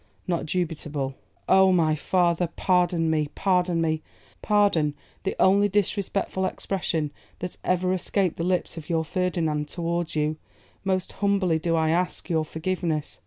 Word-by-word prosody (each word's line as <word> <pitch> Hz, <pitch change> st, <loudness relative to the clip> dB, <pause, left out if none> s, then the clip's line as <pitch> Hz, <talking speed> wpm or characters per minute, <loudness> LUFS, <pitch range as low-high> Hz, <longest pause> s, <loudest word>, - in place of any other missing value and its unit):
not 170 Hz, -3 st, -1 dB
dubitable.' 150 Hz, -5 st, -2 dB, 0.3 s
'Oh! 190 Hz, 0 st, +6 dB
my 165 Hz, -4 st, +3 dB
father, 175 Hz, +1 st, +1 dB
pardon 175 Hz, -3 st, +2 dB
me, 155 Hz, -2 st, +1 dB
pardon 180 Hz, -3 st, +2 dB
me; 160 Hz, -1 st, 0 dB, 0.4 s
pardon 200 Hz, -8 st, +2 dB, 0.3 s
the 195 Hz, -, -1 dB
only 200 Hz, +2 st, +5 dB
disrespectful 200 Hz, -1 st, 0 dB
expression 170 Hz, -5 st, -1 dB, 0.3 s
that 180 Hz, 0 st, -6 dB
ever 185 Hz, 0 st, +1 dB
escaped 185 Hz, -1 st, 0 dB
the 165 Hz, -, -2 dB
lips 180 Hz, -1 st, 0 dB
of 155 Hz, -, -8 dB
your 165 Hz, -1 st, +1 dB
Ferdinand 160 Hz, -4 st, -1 dB
towards 170 Hz, -1 st, -2 dB
you; 155 Hz, 0 st, 0 dB, 0.5 s
most 190 Hz, -2 st, -1 dB
humbly 195 Hz, -5 st, +1 dB
do 165 Hz, +1 st, 0 dB
I 160 Hz, -1 st, +2 dB
ask 180 Hz, +1 st, -1 dB
your 160 Hz, -1 st, +1 dB
forgiveness. 160 Hz, -2 st, -2 dB
175 Hz, 140 wpm, -25 LUFS, 160-185 Hz, 0.5 s, Oh